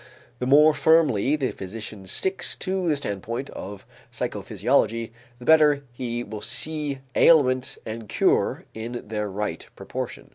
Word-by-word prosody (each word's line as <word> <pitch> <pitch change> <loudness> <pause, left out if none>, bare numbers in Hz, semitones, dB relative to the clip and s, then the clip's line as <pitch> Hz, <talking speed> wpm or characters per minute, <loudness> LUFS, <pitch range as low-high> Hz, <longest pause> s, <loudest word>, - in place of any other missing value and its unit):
The 125 - -2
more 150 +3 +6
firmly 150 -6 +3
the 135 -4 -1
physician 100 0 -8
sticks 190 - +1
to 185 -2 -2
the 150 - +2
standpoint 115 +2 -4
of 100 0 -8 0.3
psychophysiology, 115 0 0 0.3
the 120 - -12
better 150 -2 +5
he 120 -1 -4
will 105 -2 -7
see 150 -2 -2
ailment 130 -6 +4
and 110 -1 -7
cure - - +1
in 120 +2 -6
their 105 -1 -2
right 105 +2 -4
proportion. - - -6
125 Hz, 135 wpm, -24 LUFS, 110-150 Hz, 0.3 s, more